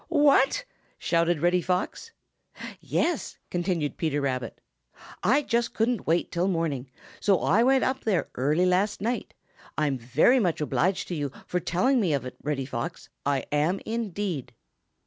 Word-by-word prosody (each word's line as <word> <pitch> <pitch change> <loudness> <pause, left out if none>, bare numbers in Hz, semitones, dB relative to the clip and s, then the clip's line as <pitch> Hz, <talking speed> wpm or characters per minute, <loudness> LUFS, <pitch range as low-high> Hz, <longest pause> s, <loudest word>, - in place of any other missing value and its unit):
"What!" 295 - +4 0.3
shouted 170 -2 +1
Reddy 175 +1 +3
Fox. 185 - -2 0.7
"Yes," 340 -4 -1
continued 175 -4 -1
Peter 155 -3 0
Rabbit, 130 -4 -3 0.6
"I 290 +3 +3
just 235 -2 0
couldn't 230 -1 0
wait 165 +2 +1
till 175 +2 0
morning, 160 -8 -1 0.3
so 195 -4 +3
I 205 +7 +3
went 265 +2 +4
up 265 +1 -1
there 200 -6 +1
early 150 +8 +2
last 185 +3 +1
night. 235 +5 -3 0.4
I'm 145 -4 0 0.4
much 175 -5 0
obliged 180 +5 0
to 175 - -2
you 145 -3 -2
for 180 - -1
telling 210 +10 +2
me 175 -7 +1
of 140 -2 -1
it, 125 - -7
Reddy 140 -3 -2
Fox; 120 -3 -5 0.2
I 140 -2 +1
am 155 +6 +1
indeed." 205 - -3
180 Hz, 145 wpm, -27 LUFS, 150-225 Hz, 0.7 s, What